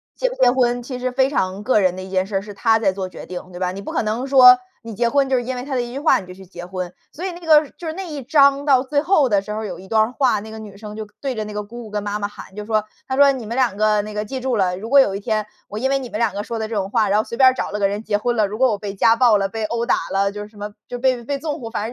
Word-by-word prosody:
结 - - 0
不 - - -7
结 250 -1 +4
婚， 245 -1 +1
其 250 0 -6
实 255 0 -2
非 265 +1 +2
常 190 -6 -1
个 250 -3 +3
人 185 -2 +2
的 185 - -7
一 190 - -9
件 190 0 0
事 200 - -6
儿， - - -1
是 205 0 -9
她 225 +2 +3
在 195 -4 +2
做 190 -1 -4
决 - - -10
定， 180 0 -8
对 175 - -9
吧？ 180 -1 -1
你 195 +1 -7
不 - - -6
可 - - 0
能 225 +5 -2
说， 250 -2 +8 0.3
你 225 -1 -7
结 235 +2 +1
婚 275 0 +2
就 260 - +2
是 245 - -1
因 255 +1 -4
为 250 - -5
她 275 -2 -3
的 245 - +1
一 240 0 -6
句 275 - -4
话 310 - +4
你 185 - -11
就 180 - -9
去 190 0 -13
结 175 -1 -9
婚。 180 -1 -5 0.2
所 350 +5 -6
以 375 - -2
那 345 - -10
个 310 -3 +4
就 335 - -7
是 315 - -3
那 380 +2 -6
一 290 -3 -5
章， 280 +1 +4
到 265 -3 +4
最 285 +2 0
后 305 -6 +3
的 200 -2 +3
时 210 - -8
候 220 +1 -4
有 195 - -6
一 190 - -12
段 220 0 +3
儿 230 - -3
话， 255 -7 +2
那 220 +1 -10
个 220 - -8
女 205 -2 -10
生 210 0 -9
就 215 -1 -6
对 270 -3 -2
着 215 -1 -3
那 210 - -7
个 210 0 -3
姑 235 +3 -9
姑 - - -10
跟 210 -1 -2
妈 205 0 -3
妈 205 - -1
喊， 205 -2 -12
就 210 0 -6
说， 215 -1 +1 0.2
她 260 - -2
说： 280 -1 +7
“你 245 -4 -6
们 230 +3 -4
2 245 -6 +1
个， 215 -1 +3
那 210 0 -7
个 210 0 -3
记 260 +4 -5
住 255 -3 0
了， 180 -2 +1
如 220 +4 -7
果 280 - +7
有 195 -6 +1
一 200 - -5
天， 215 0 -1 0.2
我 210 - -5
因 265 +2 0
为 275 - +3
你 250 -3 -7
们 210 - -4
2 225 -4 +1
个 205 +1 -3
说 230 0 -5
的 220 - -2
这 225 - -5
种 195 -1 -1
话， 220 -3 +2
然 205 - +3
后 - - +1
随 235 - -7
便 260 -1 +7
儿 - - -6
找 - - -3
了 210 - -3
个 200 - +3
人 205 +2 -4
结 205 -2 0
婚 240 +3 -1
了。 215 -2 +3
如 210 +2 -6
果 260 -3 +4
我 205 - -1
被 200 -1 -6
家 225 +4 +4
暴 235 -4 +5
了、 195 0 0
被 225 0 -4
殴 235 +1 -2
打 - - +3 0.2
了， 200 +1 +1
就 205 - -6
是 210 - -11
什 210 - -20
么， 205 0 -6 0.2
就 245 - -5
被 255 -2 +1
被 280 +3 -3
纵 300 -1 -4
火。” 225 - -6
反 210 - -3
220 Hz, 385 characters per minute, -21 LUFS, 205-260 Hz, 0.3 s, 说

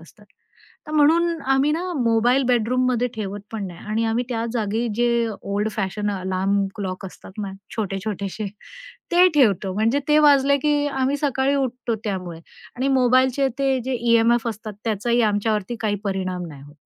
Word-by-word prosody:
असतात. 210 +5 -18 0.6
तर 305 - -7
म्हणून 330 +3 +3
आम्ही 270 +2 +3
ना, 355 +3 -2
मोबाईल 240 +3 +3
बेडरूममध्ये 250 +1 +2
ठेवत 205 -2 -5
पण 210 -3 -3
नाही 175 -2 -10
आणि 220 +2 0
आम्ही 230 +2 0
त्या 230 -2 -2
जागी 225 0 -1
जे 240 +1 +2 0.4
ओल्ड 205 +2 -1
फॅशन 210 0 -2
अलार्म 190 +1 0
क्लॉक 195 -2 -5
असतात 185 - -12
ना, 195 - -4 0.3
छोटे-छोटेसे 200 0 -3 0.7
ते 360 +1 +7
ठेवतो. 200 -8 +3
म्हणजे 225 +6 +2
ते 300 0 +5
वाजले 280 -2 +5
की 290 0 +1
आम्ही 270 0 0
सकाळी 275 -1 0
उठतो 250 -3 -2
त्यामुळे. 180 -5 -4 0.4
आणि 260 +3 0
मोबाईलचे 255 +2 +3
ते 270 -1 +2
जे 260 - -2
ई-एम-एफ 235 0 +3
असतात 215 -1 -6
त्याचाही 230 +2 +1
आमच्यावरती 210 +1 -1
काही 210 -2 0
परिणाम 185 -2 -2
नाही 140 -3 -11
होत. 145 +1 -15
230 Hz, 155 wpm, -22 LUFS, 200-265 Hz, 0.7 s, ते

